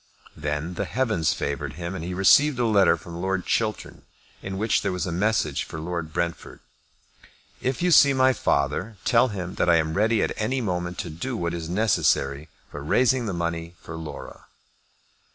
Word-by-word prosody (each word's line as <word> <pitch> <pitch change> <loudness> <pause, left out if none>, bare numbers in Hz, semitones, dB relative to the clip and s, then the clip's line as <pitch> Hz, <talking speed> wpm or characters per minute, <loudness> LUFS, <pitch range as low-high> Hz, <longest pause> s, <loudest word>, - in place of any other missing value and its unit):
Then 75 +3 -3
the - - -3
heavens 110 - 0
favoured 70 0 -3
him, 85 +3 -5
and 95 - -5
he 90 +1 -4
received 130 +9 +5
a 120 - +1
letter 100 -6 +4
from 85 +3 -9
Lord 95 -1 -1
Chiltern, 110 -3 -2 0.4
in 95 0 -5
which 110 +3 +1
there 100 - -1
was 90 -2 -2
a 90 - -3
message 90 -5 0
for 80 - -8
Lord 85 -1 -4
Brentford. 85 0 -3 1.0
"If 130 +6 -2
you 180 - +3
see 140 -3 +7
my 130 -1 +4
father, 75 - -1
tell 125 +2 +4
him 95 -5 -5
that - - +3
I 85 - +6
am 80 -1 +1
ready 110 +4 +2
at - - -1
any 125 +5 -1
moment 90 -5 -3
to - - -6
do 115 +11 -4
what 85 -2 -2
is 85 -1 -5
necessary 80 -7 +1 0.2
for 75 - -7
raising 125 - +2
the 100 - -2
money 85 0 -3
for 80 - -9
Laura." 80 -1 -9
90 Hz, 185 wpm, -25 LUFS, 80-110 Hz, 1.0 s, see